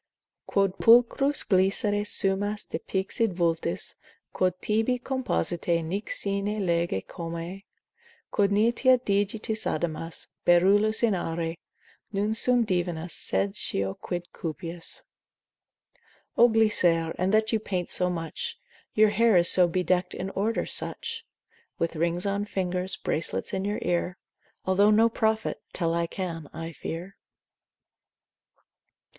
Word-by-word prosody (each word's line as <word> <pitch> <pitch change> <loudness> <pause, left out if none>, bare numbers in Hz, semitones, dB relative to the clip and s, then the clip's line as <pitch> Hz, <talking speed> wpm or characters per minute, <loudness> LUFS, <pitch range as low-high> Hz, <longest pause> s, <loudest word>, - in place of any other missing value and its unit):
Quod 195 -1 0
pulchros 245 +5 +4
Glycere 200 +2 +2
sumas 205 +2 +1
de - - -4
pixide 195 +3 -2
vultus, 170 -2 -1 0.4
Quod 185 -1 0
tibi 225 +4 0
compositae 175 - -1
nec 195 +6 -4
sine 200 +1 -2
lege 170 - 0
comae: 170 +3 -7 0.7
Quod 200 -1 +2
niteat 240 +5 +3
digitis 210 +2 -1
adamas, 165 0 -3 0.2
Beryllus 205 +6 +4
in 225 -3 +4
aure, 165 -2 -3 0.6
Non 205 +2 0
sum 245 +1 +2
divinus, 175 -3 -2
sed 195 0 -1
scio 95 - -1
quid 175 - -6
cupias. 165 +1 -7 1.3
O 240 +1 +6
Glycere, 175 -7 +3
in 185 +1 +1
that 215 +2 +2
you 220 - +2
paint 185 -4 -3
so 180 - +3
much, 180 - -4 0.4
Your 215 0 +5
hair 220 -1 +4
is 170 0 +7
so 180 -1 +7
bedeckt 180 +1 0
in 190 +1 -4
order 215 +4 -1
such. - - -3 0.5
With 165 0 -2
rings 170 +3 0
on 200 +1 -1
fingers, 185 -2 0
bracelets 95 - -2
in 190 0 -2
your 205 +1 -1
ear, 175 +1 -1 0.5
Although 195 +2 +4
no 220 +2 +5
prophet, 220 -1 -1
tell 165 -2 0
I 170 0 0
can, 165 -5 -5
I 165 0 -6
fear. 170 +4 -7
190 Hz, 125 wpm, -26 LUFS, 170-215 Hz, 1.3 s, is